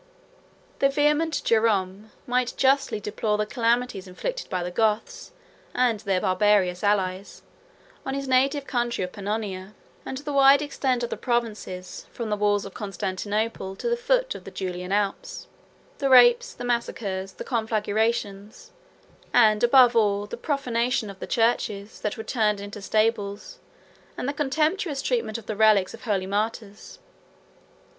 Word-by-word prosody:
The 275 - +4
vehement 300 +3 +1
Jerom 210 -2 +1
101 - - -27
might 250 0 0
justly 270 -4 +2
deplore 210 +1 -2
the 210 - 0
calamities 230 -3 0
inflicted - - -5
by 185 -3 -2
the 180 - -4
Goths, 215 +3 -1 0.4
and 245 -4 +2
their 195 -2 0
barbarous 185 -1 +2
allies, 195 -2 -1 0.6
on 270 - -3
his 275 0 -4
native 270 +2 +2
country 240 -6 -1
of 180 - -4
Pannonia, 200 -1 -4 0.3
and 265 - -5
the 290 +1 -5
wide 275 +1 +6
extent 260 -4 -1
of 240 - -3
the - - -3
provinces, 215 -6 -3
from 230 -3 -5
the - - +2
walls 205 0 +1
of - - -9
Constantinople 200 +1 -3
to - - -5
the 475 - +2
foot - - +1
of - - -10
the - - -9
Julian 180 -1 -5
Alps; 200 -1 -2 0.5
the 275 -1 0
rapes, 480 - +6
the - - -6
massacres, 200 -5 -2
the - - -7
conflagrations; 220 -2 -2 0.6
and, 215 -2 +4
above 245 0 +6
all, 205 -2 +2
the 205 - -7
profanation 245 -5 -1
of 195 - -15
the - - -6
churches, 220 -3 0
that 210 +3 -3
were 220 - -5
turned 215 -5 0
into 205 +1 -8
stables, 215 - -1 0.6
and 250 - -3
the 285 - -1
contemptuous 305 +2 0
treatment 460 - -1
of 230 - -11
the 215 - -4
relics 210 -3 +4
of - - -11
holy 200 -4 0
martyrs. 210 - -4
220 Hz, 150 wpm, -25 LUFS, 200-255 Hz, 0.6 s, wide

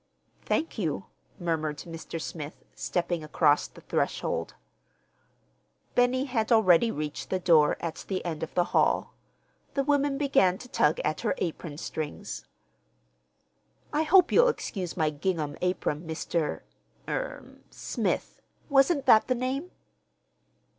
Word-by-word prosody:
"Thank 315 -6 -1
you," 165 -1 -2 0.3
murmured 160 -4 -1
Mr. 165 +1 -7
Smith, 155 -1 -7
stepping 175 -2 -2
across 150 -1 +3
the - - -16
threshold. - - -2 1.4
Benny 250 +2 +3
had 240 -4 -1
already 220 -1 +5
reached 150 -6 -4
the 190 - +1
door 160 -5 +4
at 165 -2 -5
the 185 -2 -3
end 160 -3 -3
of 160 - -4
the 175 - +4
hall. - - +2 0.6
The 275 - +2
woman 285 -1 +2
began 195 -11 +3
to 250 - -11
tug 275 - +2
at - - -1
her - - 0
apron 160 -3 -4
strings. 160 +5 -5 1.5
"I 300 - +2
hope 360 +3 +5
you'll - - +6
excuse 190 - -3
my 155 -2 +2
gingham 155 -2 -2
apron, 175 -3 -1
Mr.—er—Smith. 165 - -4 0.3
Wasn't 275 +1 +4
that 215 - +6
the 255 - +2
name?" 265 +7 -2
180 Hz, 120 wpm, -28 LUFS, 160-260 Hz, 1.5 s, you'll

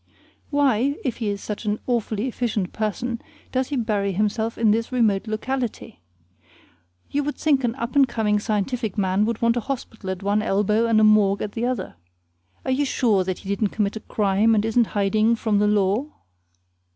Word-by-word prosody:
Why, 280 -2 +2
if 245 -4 -1
he 225 -3 -2
is 200 0 -4
such 210 +1 -5
an 210 0 0
awfully 230 -2 -1
efficient 225 -7 -2
person 230 +3 -2 0.3
does 260 0 0
he 290 - -2
bury 210 -5 0
himself 215 +3 -1
in 220 -2 +3
this 230 +3 0
remote 220 -5 +1
locality? 235 - -4 1.1
You 290 +1 0
would 295 +1 -3
think 280 -4 +1
an 235 -1 0
up 235 +1 -5
and 275 -2 +6
coming 220 -3 +1
scientific 215 +1 -2
man 195 +1 +2
would 230 0 -3
want 230 +1 +3
a 235 - -4
hospital 225 -7 -5
at 190 +1 -4
one 205 +1 +1
elbow 210 +2 +1
and 225 -1 +4
a - - +4
morgue 210 -2 +4
at 210 - -4
the 230 +3 -2
other. 210 - -4 0.7
Are - - 0
you 270 +3 +2
sure 230 -8 +2
that 185 0 -3
he 195 - -10
didn't 200 +1 0
commit 210 -1 0
a - - -4
crime 210 +2 +2
and 210 0 +1
isn't 225 0 +2
hiding 215 +3 +3
from 220 -2 0
the 210 - +3
law? 210 +5 +2
220 Hz, 190 wpm, -23 LUFS, 205-240 Hz, 1.1 s, and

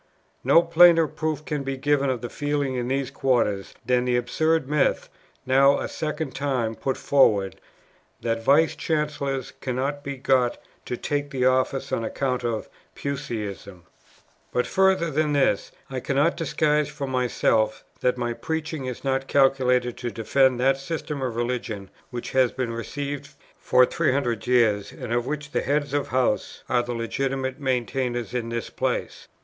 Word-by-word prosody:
No 165 - +6
plainer 170 0 +6
proof 155 0 -3
can 150 -2 -2
be 135 0 -3
given 140 0 +1
of 125 -3 -1
the 120 - -5
feeling 145 -2 -1
in 125 -1 -2
these 135 0 -1
quarters, 120 -8 0
than 125 0 +2
the 125 -1 +2
absurd 155 +5 +1
myth, 150 0 +1 0.4
now 135 +2 +5
a - - -3
second 155 -2 -4
time 130 -5 -1
put 130 +3 -2
forward, 105 -9 +3 0.6
'that 115 -1 -1
Vice 155 +5 +4
Chancellors 145 -4 -2
cannot 135 +3 -2
be 140 -1 -5
got 130 -2 +2 0.3
to 125 - -3
take 145 +2 -2
the 130 -3 -1
office 130 +1 +1
on 115 - 0
account 125 +2 -2
of 115 -2 -2 0.3
Puseyism.' 110 - -5 0.7
"But 125 - +1
further 190 -3 +2
than 150 +1 +1
this, 135 -8 +1 0.2
I 130 -1 -4
cannot 140 +6 +1
disguise 150 -2 +1
from 140 -2 -5
myself 115 -3 +1 0.2
that 125 0 +1
my 120 -1 -1
preaching 160 +1 -4
is 125 -2 -5
not 135 0 0
calculated 130 -3 +2
to 120 - -3
defend 125 +3 +2
that 135 +1 +3
system 150 0 -4
of 125 -3 -2
religion 120 -5 -3 0.2
which 120 -1 -6
has 130 -2 +3
been 125 -3 -3
received 140 +5 -5 0.2
for 125 - +5
300 125 -4 0
years, 110 -5 +3
and 125 -3 -5
of 120 0 0
which 150 0 -4
the - - 0
Heads 145 0 -1
of 145 -1 0
Houses 125 -4 0
are 125 - +2
the 120 0 -4
legitimate 130 +3 -2
maintainers 125 -3 -1
in 120 -2 -2
this 115 -1 -4
place. - - -3
130 Hz, 160 wpm, -25 LUFS, 120-145 Hz, 0.7 s, No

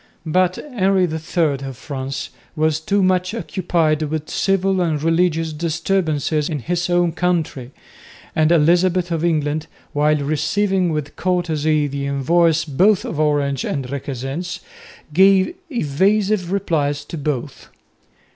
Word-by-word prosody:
But 180 +3 +2
Henry 195 -9 0
III 160 -3 0
of 135 -2 -6
France 135 -1 -5 0.2
was 155 -1 +1
too 195 +5 +1
much 185 +2 +1
occupied 170 -8 0
with 155 0 -3
civil 195 -1 +1
and 160 -4 0
religious 165 -1 +1
disturbances 160 -2 -1
in 155 - -2
his 175 +6 -2
own 175 -1 +2
country, 160 -7 -1 0.7
and 155 +1 +3
Elizabeth 175 +2 +3
of 165 -1 -1
England, 155 -2 0 0.3
while 150 +1 +3
receiving 170 +6 0
with 150 -2 -4
courtesy 155 -4 0
the 140 0 -3
envoys 160 +4 +2
both 185 +8 +2
of 155 - -4
Orange 145 -3 +1
and 135 -3 -3
Requesens, 140 +5 -4 0.5
gave 190 - +5 0.2
evasive 195 - +1
replies 155 -7 -1
to - - -7
both. 140 -4 -4
160 Hz, 125 wpm, -20 LUFS, 150-180 Hz, 0.7 s, gave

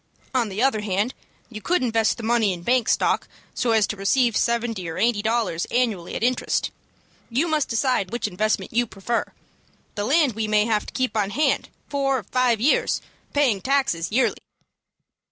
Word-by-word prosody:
On 240 -4 +1
the 200 +5 -2
other 265 -6 +2
hand, 210 +4 -1 0.3
you 215 -3 -9
could 350 - +1
invest 225 -2 +1
the 235 - -8
money 225 -3 +2
in 175 -1 -8
bank 245 +2 +2
stock, - - +1 0.3
so 245 - -1
as 220 -2 +4
to 210 - -4
receive 230 +4 +2
seventy 230 -7 0
or 160 - -6
eighty 230 -3 +2
dollars 220 -6 0
annually 225 -8 -1
at - - -3
interest. 250 +1 0 0.6
You 265 +8 +1
must 310 -3 +1
decide 230 -4 0
which 240 -2 -2
investment 215 +4 -1
you 240 +1 +2
prefer. 215 +4 -3 0.6
The 205 - -3
land 290 0 +3
we 220 0 -2
may 210 0 +3
have 215 -2 0
to - - -9
keep 255 -4 -1
on 205 -2 +1
hand 300 +9 0 0.2
four 275 -1 0
or 235 - -5
five 245 +2 +1
years, 270 +7 +2 0.3
paying 255 -9 +2
taxes 255 - 0
yearly." 255 +4 +2
230 Hz, 180 wpm, -23 LUFS, 210-255 Hz, 0.6 s, as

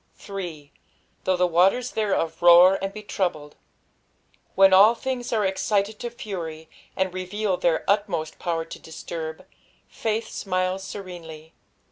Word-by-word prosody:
8. 170 -8 -7 0.5
"Though 185 -1 +2
the 180 0 +3
voter* 185 +8 +3
thereof 200 -9 -1
roar 175 +2 +7
and 195 - -2
ia 210 - -8
tmyiled." 165 -8 -2 1.0
When 195 0 +6
all 205 +5 +7
things 245 0 -4
are 215 -3 +1
excited 200 +2 0
to 240 - -4
fury, 170 -9 -7 0.3
and 190 -1 -1
reveal 185 +2 -2
their 170 -2 +1
utmost 195 -6 0
power 165 -2 -2
to - - -10
diatnrb, 160 0 -7 0.4
faith 225 0 -2
smiles 185 0 -2
scienelj. 165 -5 -9
185 Hz, 130 wpm, -24 LUFS, 165-205 Hz, 1.0 s, roar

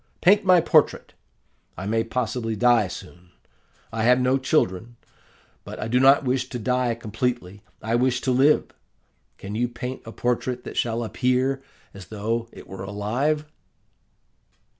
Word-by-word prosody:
Paint 200 +3 +5
my 185 -2 +6
portrait. 160 -2 +2 0.6
I 90 - -5
may 115 +2 0
possibly 115 -1 -2
die 115 -1 +3
soon. 90 0 -11 0.6
I 115 - -2
have 125 +3 +4
no 130 +1 +2
children; 120 -5 0 0.7
but - - -9
I - - -3
do 125 +2 +2
not 135 +2 +6
wish 130 0 -1
to 125 - -5
die 125 +1 0
completely, 110 -3 -3 0.2
I 110 +1 -2
wish 125 +1 +2
to 130 - 0
live. 135 +4 +3 0.7
Can 100 - -8
you 120 +3 0
paint 125 +2 -6
a 115 - -9
portrait 125 +1 -2
that - - -8
shall 115 0 -1
appear 130 +3 0 0.3
as 95 -2 -11
though 115 +2 -3
it - - -13
were 95 0 -8
alive? 120 +10 -1
120 Hz, 150 wpm, -24 LUFS, 110-130 Hz, 0.7 s, my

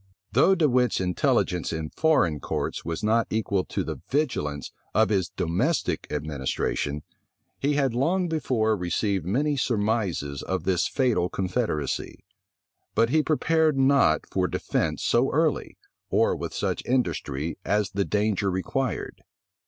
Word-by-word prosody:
Though 140 - +5
De 165 -4 +3
Wit's 125 -2 +2
intelligence 90 -1 +1
in 80 -2 -4
foreign 95 - +2
courts - - -3
was 85 +3 -4
not 110 +2 +2
equal 100 -3 0
to - - -2
the - - -6
vigilance 75 - -1 0.2
of 110 +1 +4
his 95 -5 +1
domestic 95 - -1
administration, 75 0 -2 0.6
he 145 +2 +1
had 135 -4 +1
long 175 +9 +1
before 125 -9 +1
received 90 0 -1
many 145 +9 +1
surmises 105 - -1
of 95 0 -2
this 90 -2 +1
fatal 120 -10 +1
confederacy; 95 - -2 0.7
but 115 +1 +3
he 155 - +4
prepared 155 -1 +2
not 135 +1 +4
for - - +1
defence - - -1
so 120 +3 +2
early, 155 +1 0 0.3
or - - +2
with - - -5
such - - -1
industry, 85 - -1
as 105 -1 0
the 100 0 0
danger 105 -1 0
required. 115 +8 -2
110 Hz, 135 wpm, -26 LUFS, 90-135 Hz, 0.7 s, Though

